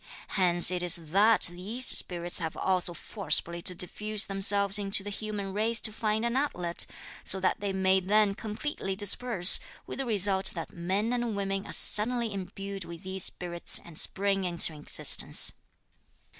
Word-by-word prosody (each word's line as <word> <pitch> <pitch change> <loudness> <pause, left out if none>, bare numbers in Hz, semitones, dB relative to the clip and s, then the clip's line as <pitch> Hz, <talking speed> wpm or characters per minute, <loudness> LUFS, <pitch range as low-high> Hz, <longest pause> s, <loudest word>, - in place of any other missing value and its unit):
Hence 175 -2 +2
it 180 -1 -2
is 180 -1 +4 0.2
that 215 +4 +3
these 195 +9 -1
spirits 175 -1 0
have 160 -2 -6
also 185 -2 0
forcibly 170 -2 -2
to 180 - +1
diffuse 210 +4 -1
themselves 200 0 +1
into 195 -1 +1
the 205 - -7
human 205 -2 -6
race 225 +3 -1
to 215 - -1
find 215 +1 -2
an 235 +1 -2
outlet, 180 -12 -2 0.4
so 190 - +5
that 185 +3 -1
they 200 -1 -4
may 190 0 +1
then 205 +2 +1
completely 210 -1 -6
disperse, 205 -1 +4 0.3
with - - -9
the 270 - -3
result 200 -3 +1
that 165 - -8
men 195 +7 -3
and 240 -3 -3
women 195 0 -4
are - - -9
suddenly 230 +1 +4
imbued 195 0 -7
with 170 +1 -12
these 190 0 0
spirits 175 -1 -3
and 170 -2 -7
spring 195 0 -2
into 170 -2 +4
existence. 150 -1 +3
195 Hz, 160 wpm, -27 LUFS, 180-215 Hz, 0.4 s, so